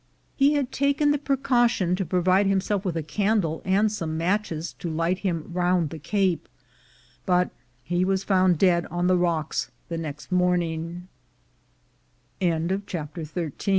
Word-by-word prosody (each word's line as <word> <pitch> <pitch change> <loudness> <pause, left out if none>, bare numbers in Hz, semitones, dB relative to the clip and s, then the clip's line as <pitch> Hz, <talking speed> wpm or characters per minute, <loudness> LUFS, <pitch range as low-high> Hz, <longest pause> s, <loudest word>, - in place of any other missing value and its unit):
He 280 +1 +4
had 280 -3 0
taken 280 +1 +2
the 290 - +1
precaution 240 -9 +2
to 190 - -1
provide 185 +3 +2
himself 195 +1 0
with 180 -4 -2
a 160 - -2
candle 195 -2 0
and 200 +3 +2
some 165 -6 -3
matches 170 -2 -1
to 170 - -4
light 165 +3 0
him 175 -4 -3
round 175 -3 +1
the 160 - -7
Cape, 185 +3 0 0.8
but 180 -1 +2 0.3
he 175 +1 0
was 190 0 +1
found 185 -3 +3
dead 175 -1 +3
on 175 +1 -2
the 185 0 +4
rocks 170 -3 0 0.2
the 165 -1 -3
next 150 +1 -7
185 Hz, 130 wpm, -25 LUFS, 170-205 Hz, 0.8 s, He